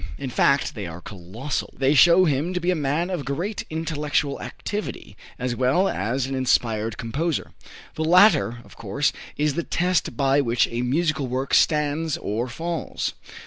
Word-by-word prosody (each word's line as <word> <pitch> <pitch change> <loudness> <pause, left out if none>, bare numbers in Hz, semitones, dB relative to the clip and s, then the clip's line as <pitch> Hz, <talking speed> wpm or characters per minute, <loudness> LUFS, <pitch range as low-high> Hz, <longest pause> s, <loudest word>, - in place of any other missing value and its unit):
In 135 -2 -5
fact 140 +3 +2
they 105 -5 -5
are 85 +1 -8
colossal. 100 +10 -5
They 135 +1 +3
show 170 +6 +6
him 155 +4 0
to - - +1
be 180 +1 +1
a - - +1
man 155 +4 -1
of 175 -6 -2
great 170 +11 -3
intellectual 150 -3 -1
activity, 205 - -6 0.2
as 125 -1 -2
well 130 +10 +2
as 125 - -1
an 135 - -4
inspired 115 -4 0
composer. 140 +7 -2 0.4
The 160 - -2
latter, 175 - +5
of - - -16
course, 115 +7 -1 0.2
is 150 -1 +1
the 170 - -1
test 180 +1 0
by 140 0 +3
which 120 -2 +2
a 120 +1 -2
musical 155 +2 0
work 130 +2 -3
stands 150 +1 +2
or 115 -4 -3
falls. 165 +6 -3
140 Hz, 165 wpm, -24 LUFS, 125-165 Hz, 0.4 s, show